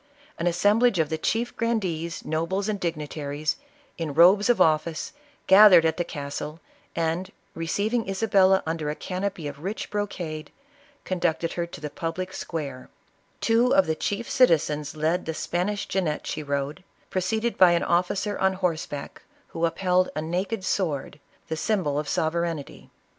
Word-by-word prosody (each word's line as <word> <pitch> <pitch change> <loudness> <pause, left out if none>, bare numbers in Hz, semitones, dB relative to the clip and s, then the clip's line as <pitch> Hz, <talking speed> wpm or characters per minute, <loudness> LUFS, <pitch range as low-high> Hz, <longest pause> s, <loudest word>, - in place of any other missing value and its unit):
An 170 - 0
assemblage 205 +6 +3
of 160 -3 +1
the 160 - -1
chief 230 +8 -1
grandees, 180 -8 -2
nobles 170 +6 -1
and 210 -2 -1
dignitaries, 150 -3 -3 0.4
in 155 -4 -3
robes 190 +7 +6
of 245 - +4
office, 160 - +1 0.3
gathered 190 -4 +8
at 160 - +1
the 175 - +1
castle, 150 +1 -6 0.4
and, 170 +3 -1 0.2
receiving 205 +7 -1
Isabella 195 -1 +3
under 160 -2 -2
a 150 - -2
canopy 185 -3 -4
of 145 0 -7
rich 195 +7 -5
brocade, 175 -7 -4 0.5
conducted 170 -2 -1
her 170 -1 -2
to 170 - -10
the 150 -1 -6
public 180 +4 -4
square; 140 -6 -5 0.5
two 235 +2 +3
of 190 - +5
the 160 - 0
chief 205 +8 -3
citizens 155 - +2
led 160 +4 0
the 160 - -2
Span 175 +5 -1
ish 205 -1 -3
jennet 170 -6 -1
she - - -3
rode, 140 +2 -3 0.3
preceded 220 +6 0
by 180 -2 +6
an 170 - +1
officer 185 +4 0
on 190 0 +3
horse 180 -4 -1
back 145 -1 -7 0.3
who 165 0 -1
upheld 180 +1 +1
a 155 - -1
naked 185 +5 -2
sword, 150 -7 -2 0.3
the 160 - -2
symbol 155 -4 0
of 150 - -4
sov 160 0 0
ereignty. 170 -4 -4
170 Hz, 160 wpm, -25 LUFS, 155-195 Hz, 0.5 s, gathered